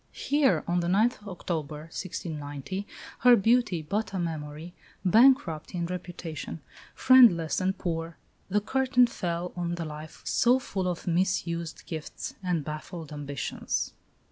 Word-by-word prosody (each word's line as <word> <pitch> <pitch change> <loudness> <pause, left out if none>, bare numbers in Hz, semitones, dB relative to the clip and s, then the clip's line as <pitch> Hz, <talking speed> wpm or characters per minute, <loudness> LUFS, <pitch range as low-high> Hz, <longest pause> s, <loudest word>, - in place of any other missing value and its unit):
Here, 285 -2 +2
on 175 +1 +1
the 170 - -1
9th 210 +3 +2
October, 160 -5 -4
1690, 165 +1 -5 0.3
her 245 0 +7
beauty 225 -6 +2
but 200 +5 -2
a - - -1
memory, 160 0 -5 0.3
bankrupt 190 - +4
in 170 -1 -1
reputation, 175 -3 -6 0.4
friendless 225 -12 +6
and 190 +1 0
poor, 165 -2 -3 0.3
the 210 +2 +2
curtain 260 +2 +3
fell 175 -6 -3
on 175 -1 -2
the 170 -1 -4
life 155 +1 -9
so 245 +1 +4
full 195 -7 -3
of 175 -2 -3
mis 180 +2 +1
used 170 -1 -5
gifts 160 -2 -6
and 175 -6 -1
baffled 155 +1 -6
ambitions. 145 -2 -3
175 Hz, 135 wpm, -28 LUFS, 160-200 Hz, 0.4 s, her